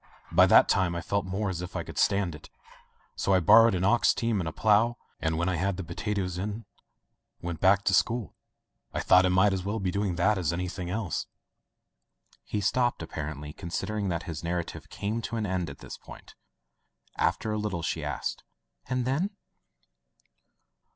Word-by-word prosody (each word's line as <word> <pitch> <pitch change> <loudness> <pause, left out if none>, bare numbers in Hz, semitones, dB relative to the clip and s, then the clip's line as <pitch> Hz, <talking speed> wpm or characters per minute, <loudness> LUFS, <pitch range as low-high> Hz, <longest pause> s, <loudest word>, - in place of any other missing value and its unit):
By - - +6
that - - +7
time 90 -3 +2
I 85 - -2
felt 100 0 -1
more 100 +3 -2
as 90 -2 -4
if 90 - -7
I - - -2
could - - -6
stand 100 -4 +2
it. 75 - -12 0.7
So 100 - +2
I - - +5
bor 110 +7 +7
rowed 115 - +3
an 90 - -1
ox 120 +5 +4
team 115 -4 0
and 85 - -3
a - - -7
plough, 110 +6 +3 0.2
and 80 0 -1
when 85 +2 0
I 90 -2 0
had 95 +2 -1
the 95 - -4
potatoes 90 0 -3
in 105 +3 -4 0.7
went 85 -2 -5
back 100 +2 +4
to 95 - +2
school. 110 +5 +1 0.6
I - - 0
thought 90 0 +5
I - - +1
might 95 +2 +4
as 95 -1 -2
well 105 +3 -2
be 95 -2 -1
doing 100 -2 -1
that 95 +4 +2
as 85 -4 0
anything 90 +1 -4
else." 100 -2 -2 1.2
He 105 - -3
stopped, 120 +4 +1
apparendy 75 -1 -6
considering 100 +4 -3
that 85 -2 -2
his 80 -2 -6
narrative 85 0 -4
came 105 +5 -3
to 115 - -4
an 110 -2 -1
end 95 -3 -2
at - - -9
this - - -9
point. - - -13 0.8
After 110 - 0
a 105 - -1
little 100 -6 -3
she - - -2
asked: - - -3 0.5
"And 125 -1 0
then?'' 145 +10 0
95 Hz, 190 wpm, -28 LUFS, 85-105 Hz, 1.2 s, that